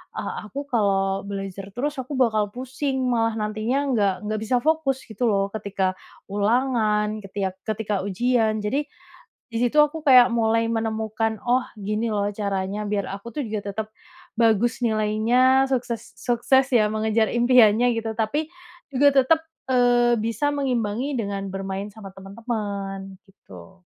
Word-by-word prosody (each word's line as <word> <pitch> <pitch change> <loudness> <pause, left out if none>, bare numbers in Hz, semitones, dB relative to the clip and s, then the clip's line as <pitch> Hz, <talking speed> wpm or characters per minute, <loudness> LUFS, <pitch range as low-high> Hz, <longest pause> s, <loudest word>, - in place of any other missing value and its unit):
"Ah 215 - -5
aku 280 +8 -5
kalau 195 -3 +1
belajar 195 -1 -5
terus 285 +3 -2
aku 260 +2 -5
bakal 220 -5 +2
pusing 265 +2 -3
malah 225 -1 +1
nantinya 215 +4 -1
nggak 205 -5 +2
nggak 215 0 -2
bisa 220 +3 0
fokus 310 -4 +1
gitu 230 +1 -2
loh 200 -2 +1
ketika 200 -3 -1 0.4
ulangan, 215 -1 +1
ketika 195 -1 -3 0.2
ketika 215 -1 -2
ujian." 220 0 +1
jadi, 280 +7 -1 0.6
di 230 - -3
situ 245 +5 +1
aku 300 +1 0
kayak 250 -3 +8
mulai 230 0 +1
menemukan, 220 -1 -2
"Oh 250 +1 +1
gini 215 +2 -2
loh 205 0 0
caranya 200 0 -3
biar 205 -1 -2
aku 200 +4 -8
tuh 300 - -2
juga 205 -3 -4
tetep 220 +1 -4 0.5
bagus 230 +1 +3
nilainya, 230 +5 +3
sukses 250 -3 -3
sukses 250 +2 +2
ya 230 -5 +4
mengejar 220 0 +1
impiannya." 240 -1 +4
gitu. 225 -1 -3
Tapi 260 +8 -1 0.5
juga 285 +3 +4 0.2
tetep, 320 +5 +3 0.3
eee, 245 -1 +4
bisa 230 +6 -1
mengimbangi 255 0 -1
dengan 200 -2 -3
bermain 195 +1 -4
sama 200 -2 -10
temen-temen, 195 -2 -5
gitu. 190 -1 -16
220 Hz, 140 wpm, -23 LUFS, 205-245 Hz, 0.6 s, kayak